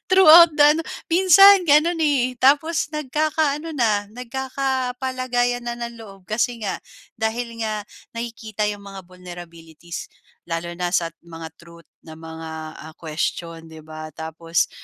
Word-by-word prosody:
throughout 340 -3 +8
the 295 - +4
ano, 325 - -2 0.3
minsan 380 +2 +7
ganun, 320 +3 +4
eh, 255 -4 +1
tapos 295 +4 +2
nagkakaano 305 +1 -1
na, 215 -5 +1
nagkakapalagayan 255 -1 -2
na 240 - -2
ng 235 -1 -7
loob 195 -4 -14
kasi 235 +2 -1
nga 195 -2 -2 0.4
dahil 230 +1 -3
nga 215 -1 -3 0.3
nakikita 225 -2 -4
yung 205 -1 -8
mga 195 -1 -9
vulnerabilities 170 -2 -10 0.4
lalo 170 0 -4
na 180 0 -2
sa 165 -1 +1 0.2
mga 165 -1 -8
truth 170 0 -17 0.2
na 160 - -10
mga, 160 0 -9 0.4
ah, 160 - -12
question, 165 +1 -4
'di 160 -1 -13
ba? 155 0 -9
Tapos 160 +1 -2
230 Hz, 135 wpm, -22 LUFS, 170-275 Hz, 0.4 s, throughout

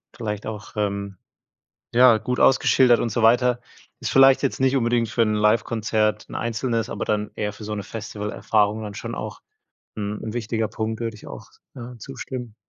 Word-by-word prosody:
vielleicht 105 -3 -4
auch, 110 -1 -7
ähm, 100 -2 -2 0.8
ja, 120 -2 +7
gut 125 +3 -3
ausgeschildert 130 -2 +5
und 115 - -1
so 120 - 0
weiter. 120 +2 +4 0.4
Ist - - -3
vielleicht 135 0 +6
jetzt 140 - -1
nicht 130 +1 +3
unbedingt 120 -2 +1
für 115 +1 +1
'n 110 -1 +1
Livekonzert, 110 0 +1
'n - - -9
einzelnes, 115 -1 -2
aber - - -4
dann 105 0 -1
eher 105 -1 -3
für 105 - -10
so 105 0 -4
'ne 100 - -4
Festivalerfahrung 105 0 -1
dann 105 -1 -6
schon 105 - -5
auch - - -6 0.6
'n 105 0 -3
'n 110 - -5
wichtiger 115 -1 -1
Punkt, 110 +1 -4
würde 115 -1 -3
ich 105 - -14
auch, - - -9 0.3
ja, 125 0 -8
zustimmen. 125 -2 -7
110 Hz, 180 wpm, -23 LUFS, 105-120 Hz, 0.8 s, ja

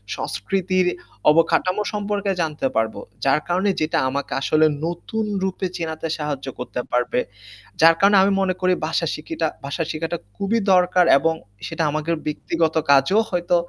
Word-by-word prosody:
সংস্কৃতির 185 - -1 0.4
অবকাঠামো 165 +5 +3
সম্পর্কে 205 -1 -1
জানতে 150 -4 -1
পারবো। 110 0 0 0.3
যার 135 +2 +4
কারণে 185 +3 +1
যেটা 155 - 0
আমাকে 140 +2 -3
আসলে 155 +2 +3 0.2
নতুন 195 +6 -3 0.2
রূপে 190 0 -2
চেনাতে 165 -1 -4
সাহায্য 145 -3 -4
করতে 125 0 -4
পারবে। 125 0 +1 0.6
যার 165 0 +7
কারণে 200 0 +5
আমি 200 - +3
মনে 185 -1 +1
করি 185 0 +3
ভাষা 165 +1 0
শিখিটা 160 +1 -3 0.2
ভাষা 140 +4 -2
শিখাটা 165 +2 -3 0.2
খুবই 215 +4 0
দরকার 180 0 +4
এবং 165 +2 +1 0.3
সেটা 165 - -2
আমাদের 155 +2 -1
ব্যক্তিগত 160 +1 -1
কাজেও 140 +11 +5
হয়তো 175 0 +1
165 Hz, 145 wpm, -22 LUFS, 155-185 Hz, 0.6 s, যার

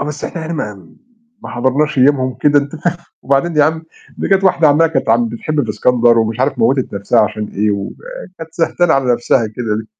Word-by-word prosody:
آه، - - -1
بس 150 0 -6
إحنا 160 -2 -5
هنا 170 - -4
ما 105 - -6 0.5
ما - - -8
حضرناش 135 +4 0
أيامهم 130 -1 +2
كده، 145 -1 +4
أنت 145 +3 -4
فاهم، 175 +2 -2 0.3
وبعدين 140 +4 0
يا 145 - +5
عم 160 +1 -1 0.4
دي - - -2
كانت 195 0 +2
واحدة 175 -4 +4
عمّاله 165 +3 +3
كانت 135 - -1
عم 235 -1 +2
بتحب 155 - -2
في 110 - -4
إسكندر 120 +2 +3
ومش 110 +2 -1
عارف 135 +2 0
موِّتت 130 +1 +1
نَفسها 100 +4 +1
عشان 105 0 -2
إيه، 105 +1 -1
وكانت 165 - -7
سهتانة 175 0 +1
على 130 -3 +1
نَفسها 120 -1 +1
كده 110 -1 -3
ليه! 110 - -6
140 Hz, 210 wpm, -15 LUFS, 115-160 Hz, 0.5 s, يا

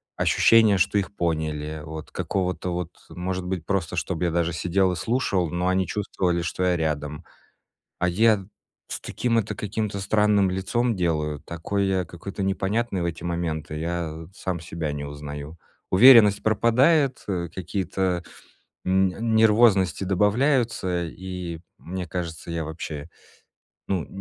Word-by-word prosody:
ощущение, 110 -3 +5
что 95 - +2
их 100 +1 -4
поняли. 80 -3 -2
Вот, 80 0 -8
какого-то, 90 -1 -2
вот, 90 0 -3 0.2
может 90 +1 -3
быть, 90 -3 -3
просто, 90 -3 -1
чтоб 85 +1 -2
я 85 -1 +1
даже 85 0 0
сидел 90 +3 +1
и - - -3
слушал, 95 -1 0
но 90 +3 -1
они 95 0 +2
чувствовали, 90 -4 -1
что 90 +1 -2
я 90 -1 +2
рядом. 75 -2 -3 0.7
А 90 - +1
я, 105 +2 +3 0.4
с - - -5
таким 115 -2 0
это 110 -1 -1
каким-то 105 0 -3
странным 105 -1 +3
лицом 115 +5 0
делаю, 75 -4 0
такой 100 +4 -2
я 95 -1 +1
какой-то 95 +4 -7
непонятный 95 +2 0
в - - -1
эти 85 -1 -4
моменты, 80 -3 -3
я 80 -1 -3
сам 95 -2 -3
себя 80 -2 -4
не 75 0 -4
узнаю. 75 +1 -7 0.3
Уверенность 110 0 +8
пропадает, 125 +6 +3
э, 90 -3 -2
какие-то, 95 -1 -2 0.6
м, 95 +4 +1
нервозности 105 -4 +4
добавляются, 105 -2 +1
и 90 -1 -6 0.2
мне 90 +1 -5
кажется, 85 -1 -5
я 85 -1 -2
вобще, 80 -1 -6 0.8
ну, 95 -5 -1
90 Hz, 140 wpm, -25 LUFS, 85-100 Hz, 0.8 s, Уверенность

